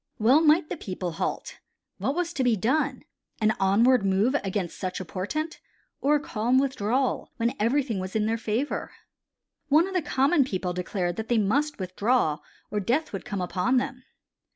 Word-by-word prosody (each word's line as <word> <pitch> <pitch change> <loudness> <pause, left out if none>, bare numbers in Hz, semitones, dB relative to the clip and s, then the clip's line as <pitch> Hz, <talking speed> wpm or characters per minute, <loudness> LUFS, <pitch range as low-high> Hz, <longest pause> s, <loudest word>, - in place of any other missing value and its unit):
Well 250 +8 +5
might 315 +1 +4
the - - -5
people 185 - -4
halt. 165 - -4 0.4
What 275 - -1
was 350 -1 -1
to 265 - 0
be 245 -3 +3
done, 250 +10 0 0.4
an 215 0 +2
onward 215 +5 +4
move 195 +6 +2
against 190 -3 -3
such 185 -1 -3
a 185 - -5
portent, 305 - -4 0.4
or 290 +2 +3
a - - +2
calm 240 -2 0
withdrawal 260 -1 0
when 235 +1 +1
everything 235 -1 +1
was 185 +2 -6
in 215 -1 +2
their 225 +1 0
favor? 225 +6 -2 0.7
One 310 +5 +4
of 385 - -6
the 365 - +1
common 280 +1 +3
people 185 -7 -3
declared 180 -1 -2
that 220 - -4
they 240 - +2
must 275 +9 +1
withdraw 185 -3 +1 0.3
or 210 - 0
death 250 +10 0
would 195 - -5
come 200 -2 -3
upon 185 +8 +1
them. 255 0 -2
230 Hz, 175 wpm, -26 LUFS, 195-275 Hz, 0.7 s, Well